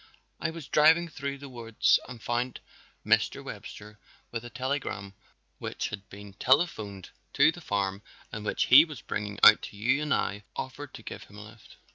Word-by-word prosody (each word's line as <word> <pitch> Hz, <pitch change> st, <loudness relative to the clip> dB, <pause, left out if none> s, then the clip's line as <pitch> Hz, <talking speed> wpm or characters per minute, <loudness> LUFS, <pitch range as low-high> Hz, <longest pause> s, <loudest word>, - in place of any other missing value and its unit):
I 165 Hz, -, -1 dB
was 160 Hz, -3 st, -8 dB
driving 160 Hz, +4 st, +5 dB
through 140 Hz, -2 st, -5 dB
the 140 Hz, +1 st, -10 dB
woods 115 Hz, -4 st, +2 dB
and 125 Hz, -2 st, -8 dB
found 120 Hz, +1 st, -2 dB, 0.5 s
Mr. -, -, +2 dB
Webster 105 Hz, 0 st, -9 dB, 0.3 s
with 115 Hz, -1 st, -4 dB
a 120 Hz, -, -8 dB
telegram 125 Hz, -6 st, -3 dB, 0.5 s
which -, -, -4 dB
had 100 Hz, -1 st, -8 dB
been 100 Hz, 0 st, -11 dB
telephoned 110 Hz, -, 0 dB, 0.2 s
to -, -, +5 dB
the -, -, -11 dB
farm 100 Hz, -1 st, -2 dB, 0.3 s
and 105 Hz, -, -6 dB
which -, -, 0 dB
he 135 Hz, +5 st, +9 dB
was 150 Hz, -7 st, -9 dB
bringing 105 Hz, -1 st, -4 dB
out 110 Hz, -, +9 dB
to 100 Hz, -, -9 dB
you 130 Hz, +7 st, +2 dB
and 150 Hz, -1 st, -3 dB
I 105 Hz, -5 st, 0 dB
offered -, -, -6 dB
to -, -, -11 dB
give -, -, -8 dB
him 100 Hz, -, -15 dB
a 105 Hz, -, -8 dB
lift." 110 Hz, +1 st, -16 dB
115 Hz, 180 wpm, -28 LUFS, 105-140 Hz, 0.5 s, he